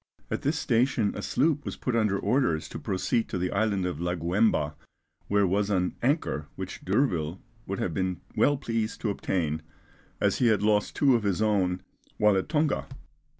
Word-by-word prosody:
At -, -, -1 dB
this 145 Hz, +2 st, 0 dB
station 120 Hz, -4 st, +2 dB
a 105 Hz, -, -4 dB
sloop 150 Hz, +6 st, +1 dB
was -, -, -5 dB
put 125 Hz, -, -2 dB
under 105 Hz, -4 st, +2 dB
orders 100 Hz, -, +1 dB
to -, -, -6 dB
proceed 105 Hz, +4 st, -1 dB
to -, -, -2 dB
the 90 Hz, 0 st, -1 dB
island 100 Hz, -2 st, +1 dB
of 90 Hz, -4 st, -3 dB
Laguemba, 85 Hz, -2 st, +1 dB, 0.5 s
where 100 Hz, 0 st, +3 dB
was 100 Hz, +2 st, +1 dB
an 90 Hz, -3 st, 0 dB
anchor 130 Hz, -, 0 dB
which -, -, -6 dB
D'Urville 90 Hz, -, 0 dB, 0.3 s
would 100 Hz, -, -2 dB
have 85 Hz, -, -2 dB
been 95 Hz, 0 st, -1 dB, 0.2 s
well 145 Hz, 0 st, +3 dB
pleased 115 Hz, -4 st, -2 dB
to 110 Hz, -, 0 dB
obtain, 80 Hz, -6 st, -1 dB, 0.6 s
as -, -, +1 dB
he 125 Hz, -, +4 dB
had 105 Hz, -3 st, +3 dB
lost 105 Hz, -1 st, +2 dB
two 140 Hz, -3 st, +4 dB
of 120 Hz, -, +3 dB
his 100 Hz, -2 st, 0 dB
own 95 Hz, -4 st, +1 dB, 0.3 s
while 105 Hz, -1 st, +4 dB
at 95 Hz, -, -1 dB
Tonga. 150 Hz, -, +1 dB
100 Hz, 180 wpm, -27 LUFS, 90-115 Hz, 0.6 s, he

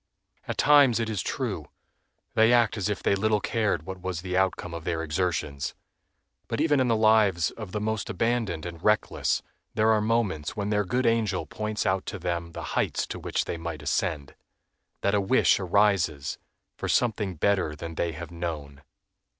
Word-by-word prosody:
At -, -, -3 dB
times, 140 Hz, -5 st, +6 dB
it 110 Hz, -1 st, -1 dB
is 105 Hz, -, -1 dB
true, -, -, -3 dB, 0.7 s
they 110 Hz, +1 st, +5 dB
act 120 Hz, -3 st, +4 dB
as 100 Hz, -1 st, -1 dB
if 105 Hz, -, -3 dB
they -, -, +3 dB
little 105 Hz, +2 st, +2 dB
cared 105 Hz, -6 st, 0 dB
what 95 Hz, +1 st, -7 dB
was 90 Hz, -2 st, -3 dB
the 90 Hz, -1 st, -3 dB
outcome 95 Hz, -2 st, 0 dB
of 85 Hz, -1 st, -6 dB
their 80 Hz, -1 st, -2 dB
exertions. 75 Hz, -5 st, -2 dB, 0.7 s
But -, -, -3 dB
even 150 Hz, -2 st, +3 dB
in 130 Hz, -, +2 dB
the 115 Hz, -, +3 dB
lives 110 Hz, -6 st, +4 dB
of 110 Hz, -5 st, -8 dB
the 105 Hz, -, -2 dB
most 110 Hz, +1 st, -2 dB
abandoned 115 Hz, -9 st, -1 dB
and 85 Hz, -1 st, -7 dB
reckless 105 Hz, 0 st, +1 dB, 0.3 s
there 110 Hz, 0 st, +4 dB
are 110 Hz, -1 st, +3 dB
moments 105 Hz, -9 st, 0 dB
when 105 Hz, 0 st, -2 dB
their 105 Hz, -1 st, +2 dB
good 125 Hz, +7 st, 0 dB
angel 110 Hz, -5 st, +1 dB
points 105 Hz, 0 st, -3 dB
out 95 Hz, 0 st, 0 dB
to -, -, -4 dB
them 85 Hz, -2 st, -3 dB
the -, -, -6 dB
heights -, -, 0 dB
to -, -, -6 dB
which -, -, -1 dB
they -, -, -3 dB
might 85 Hz, 0 st, -6 dB
ascend, 75 Hz, -4 st, -1 dB, 0.7 s
that 100 Hz, -, +1 dB
a 100 Hz, -, +3 dB
wish 115 Hz, +7 st, +3 dB
arises 95 Hz, -6 st, +1 dB, 0.4 s
for -, -, -4 dB
"Something 105 Hz, -6 st, +1 dB
better 90 Hz, -2 st, +1 dB
than 80 Hz, +2 st, -7 dB
they 85 Hz, 0 st, -1 dB
have 85 Hz, +2 st, -8 dB
known." 75 Hz, -5 st, -5 dB
95 Hz, 185 wpm, -27 LUFS, 85-110 Hz, 0.7 s, times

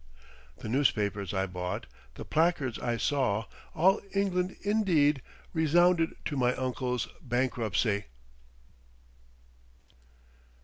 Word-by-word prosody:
The -, -, -8 dB
newspapers 105 Hz, -6 st, +1 dB
I 95 Hz, -1 st, 0 dB
bought, 90 Hz, -1 st, -4 dB, 0.3 s
the -, -, -8 dB
placards 155 Hz, -7 st, +1 dB
I 120 Hz, -1 st, -1 dB
saw, 120 Hz, -6 st, +1 dB, 0.3 s
all 190 Hz, +5 st, +4 dB
England 185 Hz, -2 st, 0 dB
indeed 170 Hz, -, +3 dB, 0.3 s
resounded 165 Hz, +1 st, +3 dB
to 150 Hz, -, -2 dB
my 125 Hz, -2 st, +2 dB
uncle's 125 Hz, -2 st, -2 dB
bankruptcy. 115 Hz, -4 st, 0 dB
130 Hz, 90 wpm, -29 LUFS, 110-165 Hz, 0.3 s, all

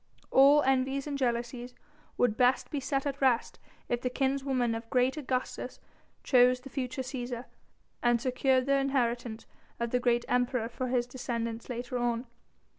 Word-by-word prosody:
All 280 Hz, +2 st, +7 dB
envies 270 Hz, +1 st, +1 dB
and 290 Hz, -1 st, -3 dB
jealousies 240 Hz, -1 st, -2 dB, 0.4 s
would 245 Hz, -3 st, +2 dB
best 250 Hz, +1 st, +2 dB
be 290 Hz, -, -1 dB
set 270 Hz, +1 st, -1 dB
at 280 Hz, 0 st, -3 dB
rest 255 Hz, -3 st, +2 dB, 0.3 s
if 240 Hz, 0 st, -1 dB
the 250 Hz, -, -1 dB
kinswoman 265 Hz, -2 st, 0 dB
of 225 Hz, 0 st, -6 dB
great 255 Hz, +2 st, +2 dB
Augustus 260 Hz, -4 st, -3 dB, 0.4 s
chose 250 Hz, -1 st, +4 dB
the 270 Hz, -, -11 dB
future 260 Hz, 0 st, -3 dB
Cæsar, 245 Hz, -2 st, -5 dB, 0.6 s
and 240 Hz, -1 st, +3 dB
secured 255 Hz, +1 st, +1 dB
the 275 Hz, 0 st, +3 dB
inheritance 240 Hz, -4 st, -1 dB, 0.3 s
of 235 Hz, 0 st, -2 dB
the 250 Hz, -, +2 dB
great 240 Hz, -1 st, +1 dB
Emperor 245 Hz, -2 st, 0 dB
for 255 Hz, +1 st, -4 dB
his 245 Hz, -1 st, +1 dB
descendants 235 Hz, -2 st, -4 dB
later 245 Hz, 0 st, -3 dB
on. 240 Hz, 0 st, -1 dB
250 Hz, 155 wpm, -30 LUFS, 240-265 Hz, 0.6 s, All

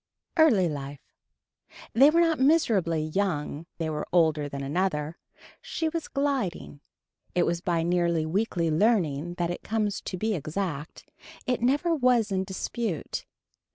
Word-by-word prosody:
Early 245 Hz, -, +5 dB
Life. 145 Hz, -2 st, -7 dB, 0.8 s
They 270 Hz, +6 st, +7 dB
were 335 Hz, +2 st, +4 dB
not 330 Hz, -2 st, +2 dB
miserably 225 Hz, -, +3 dB
young 155 Hz, -2 st, -2 dB
they 165 Hz, -, -2 dB
were 150 Hz, -1 st, -3 dB
older 160 Hz, -4 st, +2 dB
than 140 Hz, 0 st, -5 dB
another. 155 Hz, 0 st, -1 dB, 0.4 s
She 320 Hz, -1 st, -2 dB
was 330 Hz, 0 st, -4 dB
gliding. 265 Hz, -, -2 dB, 0.5 s
It 175 Hz, -, +4 dB
is 170 Hz, 0 st, -1 dB
by 170 Hz, -2 st, 0 dB
nearly 170 Hz, -2 st, +1 dB
weekly 170 Hz, -1 st, 0 dB
leaning 175 Hz, -4 st, +1 dB
that 175 Hz, -1 st, -1 dB
it 175 Hz, -, -5 dB
comes 215 Hz, -2 st, -1 dB
to 185 Hz, -, -5 dB
be 220 Hz, +4 st, 0 dB
exact. 155 Hz, -2 st, -4 dB, 0.4 s
It 250 Hz, -2 st, 0 dB
never 290 Hz, +8 st, +2 dB
was 250 Hz, -7 st, +2 dB
in 190 Hz, 0 st, 0 dB
dispute. 190 Hz, 0 st, -4 dB
180 Hz, 140 wpm, -27 LUFS, 160-235 Hz, 0.8 s, They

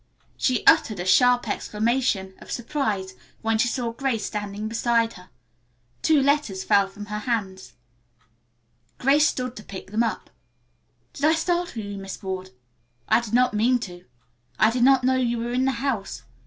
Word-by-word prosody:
She 255 Hz, -3 st, 0 dB
uttered 215 Hz, -4 st, +4 dB
a 175 Hz, -, -3 dB
sharp 245 Hz, +6 st, +4 dB
exclamation 215 Hz, -3 st, -1 dB
of -, -, -14 dB
surprise 220 Hz, -7 st, -2 dB, 0.3 s
when 225 Hz, 0 st, +1 dB
she 230 Hz, -, +3 dB
saw 240 Hz, 0 st, -2 dB
Grace 235 Hz, -3 st, -1 dB
standing 205 Hz, 0 st, -4 dB
beside 230 Hz, 0 st, +1 dB
her. 180 Hz, 0 st, -15 dB, 0.7 s
Two 315 Hz, -2 st, +4 dB
letters 280 Hz, -10 st, +1 dB
fell 200 Hz, -1 st, +3 dB
from 205 Hz, +2 st, -10 dB
her 210 Hz, 0 st, -4 dB
hands. 195 Hz, -, -3 dB, 1.2 s
Grace 290 Hz, +4 st, +4 dB
stooped 250 Hz, -1 st, -3 dB
to 210 Hz, -, -9 dB
pick 190 Hz, 0 st, -9 dB
them 220 Hz, +2 st, +1 dB
up. 225 Hz, -5 st, -2 dB, 0.8 s
"Did 285 Hz, -, -2 dB
I 315 Hz, -, +5 dB
startle 345 Hz, -7 st, -1 dB
you, 200 Hz, -1 st, -6 dB
Miss 195 Hz, +2 st, -8 dB
Ward? 190 Hz, -1 st, -4 dB, 0.6 s
I -, -, +4 dB
did 230 Hz, -1 st, -3 dB
not 250 Hz, -1 st, +3 dB
mean 235 Hz, +4 st, +3 dB
to. 175 Hz, -4 st, -8 dB, 0.5 s
I 215 Hz, -, +4 dB
did 245 Hz, +1 st, -1 dB
not 265 Hz, 0 st, +5 dB
know 260 Hz, +1 st, +3 dB
you 240 Hz, -2 st, 0 dB
were 235 Hz, +1 st, -3 dB
in 255 Hz, +1 st, +1 dB
the 270 Hz, -, +2 dB
house. 195 Hz, -, -3 dB
230 Hz, 170 wpm, -24 LUFS, 200-255 Hz, 1.2 s, I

